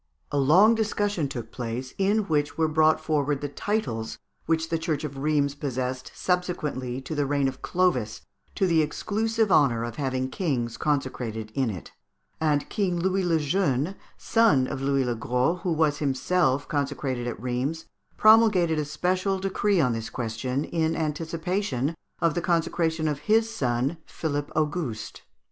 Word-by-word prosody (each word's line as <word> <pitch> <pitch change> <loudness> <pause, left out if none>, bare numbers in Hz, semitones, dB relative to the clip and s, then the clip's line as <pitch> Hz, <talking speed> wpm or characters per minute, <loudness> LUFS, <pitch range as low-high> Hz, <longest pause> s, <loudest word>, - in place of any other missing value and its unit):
A 145 - 0
long 180 +11 +6
discussion 205 -7 0
took 120 -4 -6
place, 125 +1 -5
in 205 +3 +3
which 150 -5 -1
were 160 -1 +3
brought 155 0 +3
forward 145 -2 0
the 145 - -3
titles 135 - -2 0.3
which 160 0 +1
the 165 - 0
Church 160 -2 -2
of 140 -2 -5
Rheims 145 -1 +1
possessed 130 -2 -3
subsequently 155 -9 -2
to 135 - -6
the 145 -2 0
reign 140 -1 +1
of 130 -1 -5
Clovis 130 -13 0 0.3
to 195 - +2
the 165 -3 +3
exclusive 220 +7 0
honour 125 -8 +4
of 120 -1 -5
having 130 -2 -1
kings 125 -10 -1
consecrated 125 -7 -2
in 135 -4 +1
it; 95 -6 -7 0.5
and 150 -2 +1
King 185 -4 -1
Louis 190 +2 +1
le 170 -2 +2
Jeune, 150 0 0 0.2
son 225 - +3
of 130 - -4
Louis 135 -1 +1
le 120 - 0
Gros, 125 +9 0
who 180 - -1
was 155 -2 +2
himself 145 0 +1
consecrated 140 -4 -2
at 120 - -4
Rheims, 130 +7 -2 0.3
promulgated 215 -7 +5
a 150 - -1
special 185 +6 0
decree 195 +1 +1
on 125 -6 +3
this 115 -1 -4
question, 125 +3 -2
in 160 -1 0
anticipation 160 -1 -2 0.3
of 165 -2 +2
the 175 - -1
consecration 165 -2 0
of 150 -2 -1
his 225 +1 +4
son, 130 - -1
Philippe 145 -2 -3
Auguste. 150 -7 -2
150 Hz, 160 wpm, -26 LUFS, 130-175 Hz, 0.5 s, long